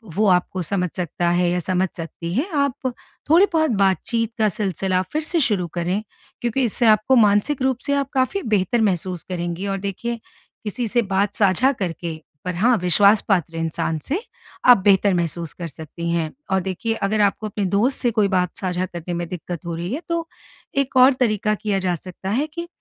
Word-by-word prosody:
वो 215 Hz, +1 st, +3 dB
आपको 180 Hz, 0 st, +1 dB
समझ 180 Hz, +1 st, -1 dB
सकता 175 Hz, -1 st, -1 dB
है 175 Hz, 0 st, +2 dB
या 180 Hz, -, 0 dB
समझ 185 Hz, +2 st, 0 dB
सकती 170 Hz, 0 st, -6 dB
है 270 Hz, -, 0 dB
आप 280 Hz, -2 st, 0 dB, 0.4 s
थोड़ी 340 Hz, +5 st, +7 dB
बहुत 315 Hz, -3 st, +2 dB
बातचीत 225 Hz, +4 st, +1 dB
का 215 Hz, -1 st, +4 dB
सिलसिला 190 Hz, -2 st, 0 dB
फिर 310 Hz, -, 0 dB
से 335 Hz, +2 st, 0 dB
शुरू 205 Hz, -, +2 dB
करें। 180 Hz, +4 st, -1 dB, 0.4 s
क्योंकि 240 Hz, +2 st, 0 dB
इससे 235 Hz, +1 st, +1 dB
आपको 215 Hz, +5 st, +4 dB
मानसिक 220 Hz, +5 st, +3 dB
रूप 260 Hz, -2 st, +1 dB
से 280 Hz, -, +2 dB
आप 280 Hz, -1 st, 0 dB
काफ़ी 270 Hz, +9 st, +1 dB
बेहतर 215 Hz, +5 st, +1 dB
महसूस 185 Hz, -4 st, 0 dB
करेंगी 175 Hz, +1 st, -3 dB
और 195 Hz, 0 st, -1 dB
देखिए 215 Hz, +5 st, -4 dB, 0.4 s
किसी 225 Hz, +2 st, -2 dB
से 240 Hz, +3 st, +2 dB
बात 200 Hz, -1 st, 0 dB
साझा 205 Hz, +6 st, +4 dB
करके 170 Hz, -, -4 dB, 0.3 s
पर 180 Hz, -1 st, -2 dB
हाँ, 235 Hz, +7 st, +3 dB
विश्वास 200 Hz, +4 st, +4 dB
पात्र 175 Hz, -4 st, +1 dB
इंसान 165 Hz, 0 st, -2 dB
से 330 Hz, +9 st, -2 dB, 0.4 s
आप 245 Hz, -1 st, +9 dB
बेहतर 200 Hz, 0 st, +5 dB
महसूस 170 Hz, -2 st, -2 dB
कर 170 Hz, -, -6 dB
सकती 160 Hz, +3 st, -7 dB
हैं। 165 Hz, -2 st, -1 dB, 0.2 s
और 190 Hz, -1 st, +2 dB
देखिए 190 Hz, +5 st, -2 dB
अगर 210 Hz, 0 st, 0 dB
आपको 205 Hz, +1 st, +1 dB
अपने 205 Hz, -1 st, -2 dB
दोस्त 210 Hz, +8 st, +1 dB
से 240 Hz, -2 st, +2 dB
कोई 215 Hz, -2 st, +2 dB
बात 180 Hz, -2 st, 0 dB
साझा 185 Hz, -1 st, -1 dB
करने 175 Hz, -1 st, -6 dB
में 170 Hz, 0 st, -3 dB
दिक्कत 175 Hz, -1 st, -6 dB
हो 170 Hz, -1 st, -3 dB
रही 175 Hz, +6 st, -4 dB
है 300 Hz, -, -3 dB
तो 335 Hz, -1 st, -1 dB, 0.5 s
एक 275 Hz, -1 st, 0 dB
और 255 Hz, +2 st, +7 dB
तरीका 215 Hz, -3 st, +1 dB
किया 210 Hz, -2 st, -1 dB
जा 185 Hz, -2 st, 0 dB
सकता 185 Hz, +3 st, -8 dB
है 260 Hz, +9 st, 0 dB
कि 340 Hz, 0 st, -5 dB
195 Hz, 195 wpm, -22 LUFS, 180-235 Hz, 0.5 s, आप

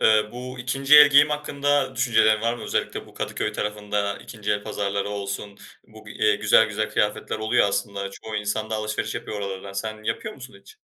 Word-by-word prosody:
Eee, 110 Hz, -1 st, +5 dB
bu 125 Hz, +1 st, -7 dB
ikinci 135 Hz, +4 st, +4 dB
el 150 Hz, -1 st, +10 dB
giyim 145 Hz, +2 st, +6 dB
hakkında 145 Hz, -2 st, 0 dB
düşüncelerin 110 Hz, -3 st, +3 dB
var 115 Hz, +1 st, 0 dB
mı? 120 Hz, -, -9 dB
Özellikle -, -, -3 dB
bu -, -, -18 dB
Kadıköy 105 Hz, -, -3 dB
tarafında 105 Hz, -1 st, -2 dB
ikinci 105 Hz, -3 st, -6 dB
el 105 Hz, 0 st, -2 dB
pazarları 100 Hz, -1 st, -2 dB
olsun, 100 Hz, 0 st, -5 dB, 0.3 s
bu 110 Hz, 0 st, -16 dB
bir, 105 Hz, -, -10 dB
eee, 105 Hz, -1 st, +2 dB
güzel 110 Hz, +1 st, +5 dB
güzel 110 Hz, 0 st, -2 dB
kıyafetler 105 Hz, +1 st, -1 dB
oluyor 110 Hz, -1 st, +2 dB
aslında 100 Hz, -1 st, -3 dB
çoğu 105 Hz, +2 st, -7 dB
insan 105 Hz, +1 st, -2 dB
da -, -, -1 dB
alışveriş 110 Hz, 0 st, -3 dB
yapıyor 105 Hz, -, -5 dB
oralardan. 100 Hz, 0 st, -6 dB
Sen 110 Hz, +2 st, -5 dB
yapıyor 215 Hz, -, -3 dB
musun 130 Hz, -4 st, -12 dB
hiç? -, -, -17 dB
110 Hz, 190 wpm, -24 LUFS, 105-125 Hz, 0.3 s, el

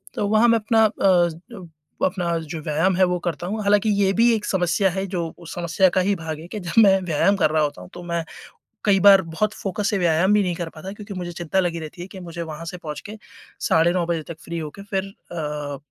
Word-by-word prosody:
तो 205 Hz, -, -1 dB
वहाँ 220 Hz, +3 st, +4 dB
मैं 230 Hz, -1 st, +4 dB
अपना 220 Hz, +1 st, +3 dB
अ, 185 Hz, 0 st, 0 dB, 0.4 s
अपना 175 Hz, -2 st, -1 dB
जो 165 Hz, -, -4 dB
व्यायाम 160 Hz, +5 st, +1 dB
है 185 Hz, -, +3 dB
वो 180 Hz, 0 st, 0 dB
करता 175 Hz, 0 st, -3 dB
हूँ। 215 Hz, +3 st, -3 dB
हालाँकि 205 Hz, +1 st, +3 dB
ये 195 Hz, -, +3 dB
भी 230 Hz, +3 st, +4 dB
एक 210 Hz, -1 st, -4 dB
समस्या 190 Hz, +1 st, +1 dB
है 190 Hz, +2 st, -2 dB
जो 175 Hz, -3 st, -3 dB
उस 170 Hz, -2 st, -10 dB
समस्या 175 Hz, +2 st, +2 dB
का -, -, +5 dB
ही 195 Hz, +2 st, +1 dB
भाग 160 Hz, -2 st, -5 dB
है 165 Hz, -, -10 dB
कि 210 Hz, +4 st, -6 dB
जब 180 Hz, +5 st, +3 dB
मैं 195 Hz, -1 st, +5 dB
व्यायाम 180 Hz, +3 st, +2 dB
कर 155 Hz, -, +3 dB
रहा 155 Hz, 0 st, +2 dB
होता 145 Hz, -11 st, -3 dB
हूँ 90 Hz, -, -11 dB
तो 175 Hz, -, -9 dB
मैं 170 Hz, -1 st, -2 dB, 0.6 s
कई 195 Hz, -2 st, +4 dB
बार 195 Hz, -1 st, +8 dB
बहुत 190 Hz, +6 st, -2 dB
फोकस 200 Hz, +1 st, -2 dB
से 205 Hz, -, 0 dB
व्यायाम 175 Hz, +2 st, +3 dB
भी 210 Hz, -, +4 dB
नहीं 180 Hz, -2 st, -1 dB
कर 170 Hz, -1 st, -4 dB
पाता 185 Hz, +5 st, -7 dB
क्योंकि 205 Hz, 0 st, -9 dB
मुझे 180 Hz, -2 st, -5 dB
चिंता 175 Hz, +2 st, -2 dB
लगी 175 Hz, -2 st, 0 dB
रहती 160 Hz, +2 st, -8 dB
है 180 Hz, -, -6 dB
कि 195 Hz, -1 st, -10 dB
मुझे 170 Hz, -1 st, -7 dB
वहाँ 160 Hz, +1 st, -7 dB
से 180 Hz, +2 st, -6 dB
पहुँच 150 Hz, -3 st, -6 dB
के 215 Hz, -, -8 dB, 0.4 s
साढ़े 165 Hz, +1 st, +3 dB
9 175 Hz, -2 st, 0 dB
बजे 165 Hz, -2 st, -1 dB
तक 165 Hz, -, -7 dB
फ्री 170 Hz, -, -5 dB
होके 155 Hz, +5 st, -7 dB
फिर 195 Hz, -2 st, -2 dB
अ, 150 Hz, -7 st, -6 dB
180 Hz, 245 wpm, -22 LUFS, 165-200 Hz, 0.6 s, बार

